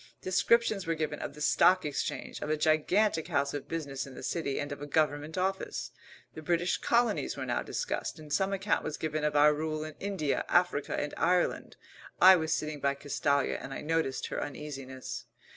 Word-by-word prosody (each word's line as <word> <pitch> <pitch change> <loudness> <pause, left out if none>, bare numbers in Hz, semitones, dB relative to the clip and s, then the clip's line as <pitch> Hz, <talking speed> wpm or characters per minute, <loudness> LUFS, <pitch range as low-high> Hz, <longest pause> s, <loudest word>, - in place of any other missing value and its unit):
Descriptions 210 0 +2
were 165 - +1
given 155 -1 -2
of - - -6
the 150 - -10
Stock 180 +3 +4
Exchange, 145 -2 -3
of - - -3
a 155 - +1
gigantic 160 +4 +2
house 140 0 0
of 145 -1 -5
business 140 -5 -4
in 135 - -11
the - - -9
City, 155 -5 -2
and 145 0 -4
of 145 - -6
a 145 - -5
Government 150 +1 0
Office. 190 +1 -2 0.4
The 155 - -8
British 175 +2 +1
Colonies 235 -2 +1
were - - -3
now - - 0
discussed, - - -3
and 150 -2 -7
some 195 0 +1
account 195 +1 0
was 155 - -4
given 155 -1 -2
of 150 0 0
our 150 +1 +6
rule 155 0 -2
in 155 0 -7
India, 190 -8 -1
Africa 175 -5 +2
and 145 - -3
Ireland. 180 0 +1 0.4
I 185 +1 +9
was 160 -2 -1
sitting 155 -1 -1
by 140 0 +1
Castalia 140 0 0
and 135 - -6
I - - -5
noticed 155 -3 -1
her - - -3
uneasiness. 135 -3 -6
155 Hz, 195 wpm, -30 LUFS, 145-180 Hz, 0.4 s, I